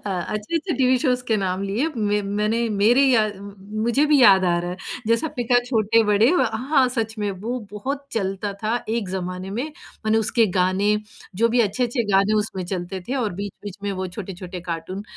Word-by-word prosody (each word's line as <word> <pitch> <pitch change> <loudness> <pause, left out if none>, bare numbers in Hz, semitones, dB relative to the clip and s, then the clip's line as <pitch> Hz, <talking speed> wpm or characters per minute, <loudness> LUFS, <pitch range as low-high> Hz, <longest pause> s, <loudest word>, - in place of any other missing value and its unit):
अ, - - -1 0.2
अच्छे-अच्छे 320 - -2
TV 255 0 +4
shows 250 -3 +1
के 220 - +3
नाम 185 +1 -1
लिए 225 +10 0
म 210 -1 +1 0.2
मैंने 220 +3 +1 0.2
मेरे 240 +7 +5
याद 215 -6 +3 0.5
मुझे 235 +5 +3
भी 290 - +6
याद 190 -4 +7
आ 175 -1 +2
रहा 175 - -3
है, 180 - -5 0.3
जैसे 230 +6 +3
आपने 280 -6 -4
कहा 245 - +6
छोटे-बड़े 220 -1 +3
अ, 360 - +3 0.2
हाँ, 265 -5 +4
सच 225 -1 -1
में 205 -1 -1
वो 250 +2 -2 0.2
बहुत 275 +7 -4
चलता 195 -1 -2
था 220 +2 0
एक 225 -4 -1
ज़माने 185 0 -4
में। - - 0 0.4
मैंने 220 +1 +3
उसके 230 0 +3
गाने, 185 +3 +2 0.5
जो 230 - +6
भी 245 - +5
अच्छे-अच्छे 240 +3 -1
गाने 195 +2 +3
उसमें 190 -4 -5
चलते 185 +1 -4
थे 265 - -1
और 210 - -1
बीच-बीच 205 -1 -8
में 205 - -2
वो - - -2
छोटे-छोटे 185 -2 -7
कार्टून, 170 +4 -4
215 Hz, 190 wpm, -22 LUFS, 195-240 Hz, 0.5 s, याद